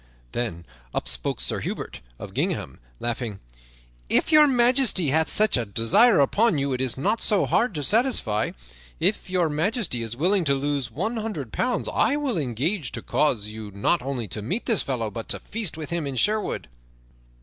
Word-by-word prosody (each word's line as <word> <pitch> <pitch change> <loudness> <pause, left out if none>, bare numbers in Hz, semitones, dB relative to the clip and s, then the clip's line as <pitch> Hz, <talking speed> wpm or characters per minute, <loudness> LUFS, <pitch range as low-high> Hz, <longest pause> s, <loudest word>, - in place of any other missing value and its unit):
Then 95 -9 -4 0.3
up - - -2
spake - - 0
Sir - - -1
Hubert - - -5 0.2
of - - -9
gingham, 65 - -2 0.2
laughing: 120 -4 -4 0.7
"If - - +2
Your 305 -1 +8
Majesty 245 - +3
hath 160 +3 +2
such 215 0 +3
a 120 - 0
desire 115 - +4
upon 190 - +3
you 140 -1 -1
it 130 - -2
is 130 -2 -1
not 210 +12 0
so 205 -3 +2
hard 235 -6 +1
to 145 - -1
satisfy. 205 - +2 0.5
If - - 0
Your 180 -2 +2
Majesty 160 - -1
is 115 +1 -4
willing 185 +5 +2
to 140 -1 +3
lose 140 -2 -2
one 210 - -3
hundred 205 - -5
pounds, 250 -1 0
I 280 - +2
will 280 - -1
engage 140 - -1
to - - -4
cause 110 -8 0
you 110 -1 -8
not 100 - +1
only 125 -4 -3
to 105 - -4
meet 185 - -3
this 225 - +3
fellow, 115 -5 -2
but 115 +2 -7
to - - -2
feast 210 -8 -2
with 160 +1 -6
him 170 -4 -2
in 135 - -4
Sherwood." 210 - 0
150 Hz, 185 wpm, -24 LUFS, -, 0.7 s, Your